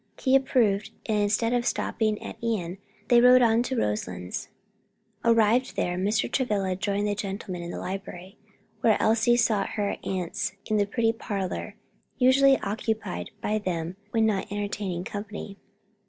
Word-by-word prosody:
He 260 0 +3
approved, 220 -6 +2 0.2
and 215 -2 +1
instead 215 +3 +1
of 245 -1 +1
stopping 215 -3 0
at - - -7
Ion 195 -6 -2 0.3
they 240 -1 +6
rode 250 0 +7
on 230 0 +4
to 255 +1 -2
Roselands. 90 - -3 0.8
Arrived 230 +2 +3
there, 175 - 0
Mr. 200 +4 +1
Travilla 200 -8 0
joined 200 +2 -1
the 205 - +1
gentlemen 195 -2 -5
in 170 - -6
the - - -5
library, 190 0 -6 0.4
while 220 -2 +4
Elsie 225 +2 +3
sought 215 -4 +1
her 205 -1 -1
aunts 190 +2 -2
in 215 - 0
the 205 -1 +2
pretty 225 +1 +1
parlor 205 -1 -4 0.4
usually 270 +1 +5
occupied 215 -2 -3
by 215 +1 0
them 175 -3 -3
when 225 -1 +2
not 200 -3 -1
entertaining 200 -3 -3
company. 205 0 -7
210 Hz, 150 wpm, -26 LUFS, 195-230 Hz, 0.8 s, rode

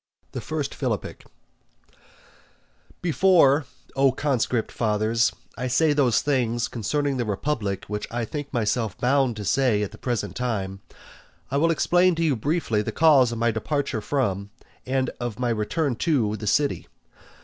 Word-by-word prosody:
I. - - -3 1.9
Before, 165 -5 +4 0.3
O 135 -1 +4
conscript 130 -4 -1
fathers, 110 +1 +1 0.2
I 125 - -3
say 150 +5 +3
those 135 -5 +3
things 120 -4 0
concerning 140 +5 -1
the 120 - -1
republic 105 -2 -2
which 105 0 -4
I 120 0 -2
think 145 +2 -6
myself 110 -3 -1
bound 130 -1 +2
to 105 -1 -6
say 120 -3 +2
at 100 - -4
the 110 - -13
present 105 -7 -3
time, 100 -6 -3 0.7
I 140 - +1
will 165 +3 +3
explain 175 +2 +3
to 165 - -1
you 150 -4 +2
briefly 125 -3 0
the - - -3
cause 145 -7 +5
of 115 - -4
my 115 +1 +2
departure 135 +1 -2
from, 100 -6 -1 0.4
and 130 0 0
of 120 -3 -4
my 125 -1 -1
return 120 +6 -1
to 120 -11 +1
the 105 0 -6
city. 140 +7 +1
125 Hz, 145 wpm, -24 LUFS, 110-145 Hz, 1.9 s, cause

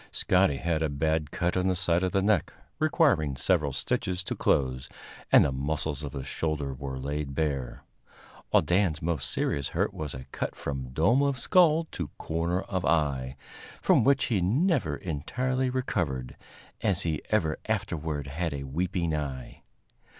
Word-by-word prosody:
Scotty 90 -5 +3
had 80 +1 -1
a 80 - +1
bad 80 +1 0
cut 85 +3 -1
on 90 0 +1
the 95 - +2
side 90 -2 +2
of 95 -1 0
the 95 -1 +1
neck, 105 -5 +2 0.3
requiring 150 - +3
several 75 -1 +2
stitches 90 +7 -2
to - - -3
close, 65 0 +1 0.4
and - - +8
the 70 - 0
muscles 70 +1 -2
of 75 -1 -6
his 70 -2 -5
shoulder 75 -4 -2
were 65 0 -5
laid 70 +1 -3
bare; 70 -5 -2 0.7
while - - +4
Dan's 90 -4 +2
most 80 -7 -2
serious 70 -1 -1
hurt - - 0
was 75 -3 -5
a 65 0 -8
cut - - -3
from 65 -3 -4
dome 100 - +3
of 140 -2 +1
skull 165 +5 +4
to 85 - -4
corner 85 +3 -1
of 95 -2 -3
eye, 70 -5 +1 0.4
from - - +4
which 140 +2 +3
he 105 -6 +1
never 125 - +2
entirely 125 - -1
recovered, 80 - -2 0.5
as 100 -5 +2
he 80 -3 -1
ever 80 -1 +1
afterward 75 -3 -2
had 75 +2 -3
a 70 - -5
weeping 85 +3 -1
eye. 70 -4 -5
80 Hz, 165 wpm, -28 LUFS, 70-95 Hz, 0.7 s, and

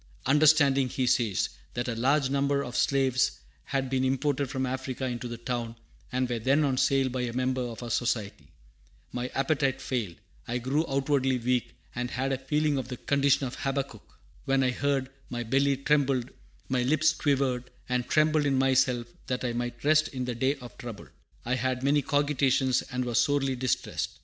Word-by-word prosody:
"Understanding," 140 -2 +4
he 130 +1 -1
says, 115 -5 +1 0.3
"that 120 +1 -2
a 120 - -1
large 135 +5 +2
number 140 0 +1
of 125 -2 -7
slaves 135 -2 +2 0.3
had 135 -1 -1
been 130 0 0
imported 135 +1 0
from 130 -1 -1
Africa 130 0 -3
into 125 -1 -3
the 120 0 -6
town, 120 -1 -4 0.4
and 130 0 0
were 120 -1 -2
then 135 +7 +3
on 135 -3 +1
sale 135 0 +3
by 130 0 -3
a 120 -1 -2
member 130 +1 0
of 120 -1 -5
our 120 - -5
Society, 110 -4 -2 0.6
my 125 0 -3
appetite 135 -1 +1
failed; 120 -10 -3 0.3
I 120 - -1
grew 135 +6 0
outwardly 135 -1 +1
weak, 125 0 -1 0.2
and 125 0 -3
had 135 +2 -1
a 130 - -2
feeling 150 +1 +1
of 125 - -5
the 125 -1 -6
condition 140 0 +2
of 125 - -6
Habakkuk: 135 -5 -4 0.3
'When 135 0 +2
I 130 - +2
heard, 135 0 -1 0.2
my 120 -1 -3
belly 135 +4 +2
trembled, 135 -3 +1 0.4
my 130 -1 +1
lips 155 +5 +3
quivered; 135 -5 0 0.2
I 125 0 +1
trembled 155 +3 +2
in 135 -1 +2
myself, 130 -2 +2 0.2
that 125 0 -2
I 120 - -1
might 120 0 -4
rest 155 +1 +4
in 130 -2 -4
the 125 - -2
day 130 +4 +1
of 125 -4 -12
trouble.' 115 -4 -8 0.4
I 125 - 0
had 130 0 -1
many 145 +2 +3
cogitations, 135 -2 +2
and 125 0 -1
was 120 -2 +1
sorely 140 -3 +1
distressed." 130 0 -2
130 Hz, 185 wpm, -28 LUFS, 125-140 Hz, 0.6 s, Understanding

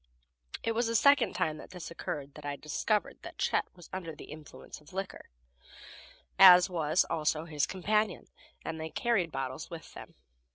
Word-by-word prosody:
It 230 - 0
was 230 +1 0
the 230 - -1
second 280 +2 +5
time 160 -4 0
that - - -11
this 180 -3 -8
occurred 145 -4 -5
that 150 - -12
I 145 0 -3
discovered 200 +9 -1
that - - -10
Chet - - +1
was 175 -2 -14
under 170 -4 -5
the - - -11
influence 150 0 -11
of 150 - -18
liquor, 195 0 -6 1.1
as 180 -1 +9
was 160 0 +2
also 155 0 0
his 150 -4 0
companion, 210 +1 0 0.4
and 160 -1 -4
they 160 - -4
carried 195 -5 0
bottles 135 +1 -4
with 165 -2 -9
them. - - -11
170 Hz, 170 wpm, -30 LUFS, 150-195 Hz, 1.1 s, as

